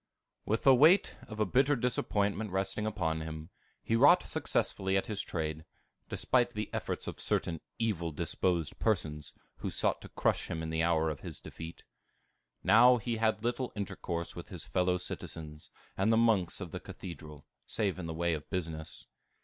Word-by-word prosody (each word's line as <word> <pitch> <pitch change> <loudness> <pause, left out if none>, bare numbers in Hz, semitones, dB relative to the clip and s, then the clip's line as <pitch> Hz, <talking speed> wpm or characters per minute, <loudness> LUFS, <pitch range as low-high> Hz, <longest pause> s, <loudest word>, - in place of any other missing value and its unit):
With 110 +2 0
the 135 - +8
weight 155 +9 +5
of 110 -1 -8
a 105 - +3
bitter 135 +8 +3
disappointment 110 -4 0
resting 95 +3 -1
upon 80 -7 -1
him, 80 +1 -7 0.3
he 115 - +1
wrought 145 +9 +6
successfully 95 0 0
at 95 - 0
his 105 -3 -2
trade, 80 -5 -3 0.5
despite 120 -2 +2
the 105 0 -3
efforts - - -3
of - - -6
certain 80 -2 +1 0.2
evil 95 -8 -1
disposed 85 +1 -1
persons, 80 -9 0 0.3
who - - -3
sought - - 0
to - - -10
crush - - 0
him 80 0 -3
in 80 - -4
the 80 0 0
hour 80 -1 +2
of 75 - -6
his - - -7
defeat. 80 +1 -9 0.8
Now 120 +6 +7
he 115 +1 -2
had 110 -1 +1
little 120 +2 -1
intercourse 85 -4 -4
with - - -8
his - - -6
fellow 90 0 +1
citizens 75 -3 -6 0.3
and 100 +4 +2
the 115 - +4
monks 110 -6 +2
of - - -6
the - - -4
Cathedral, 75 -4 -9 0.2
save 100 -3 -1
in 85 - -4
the 80 - -4
way 85 0 +1
of 75 -2 -5
business. 80 -4 -4
95 Hz, 175 wpm, -32 LUFS, 80-110 Hz, 0.8 s, the